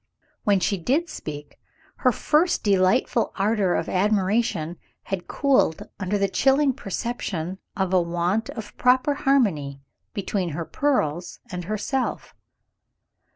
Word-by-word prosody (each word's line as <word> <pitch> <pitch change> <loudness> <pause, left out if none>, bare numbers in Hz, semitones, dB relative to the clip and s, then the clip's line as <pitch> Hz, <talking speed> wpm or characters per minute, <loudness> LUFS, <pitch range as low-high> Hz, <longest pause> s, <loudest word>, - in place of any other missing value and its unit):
When 200 -3 +4
she 195 +1 0
did 290 - +1
speak, 145 -1 -8 0.4
her 255 - +3
first 320 +9 +2
delightful 200 +4 +2
ardor 200 -2 +1
of - - -1
admiration 190 -3 +1 0.3
had 195 -3 -4
cooled 270 - +2
under 195 +1 0
the 200 0 +2
chilling 270 +6 +3
perception 190 -5 -4 0.2
of 190 -1 0
a 185 - +5
want 175 +6 -1
of 225 -3 -7
proper 255 +3 +3
harmony 195 - +1 0.4
between 195 -2 -1
her 170 - -3
pearls 175 - -1
and 180 -1 -5
herself. 215 +6 -2
200 Hz, 120 wpm, -24 LUFS, 180-250 Hz, 0.4 s, a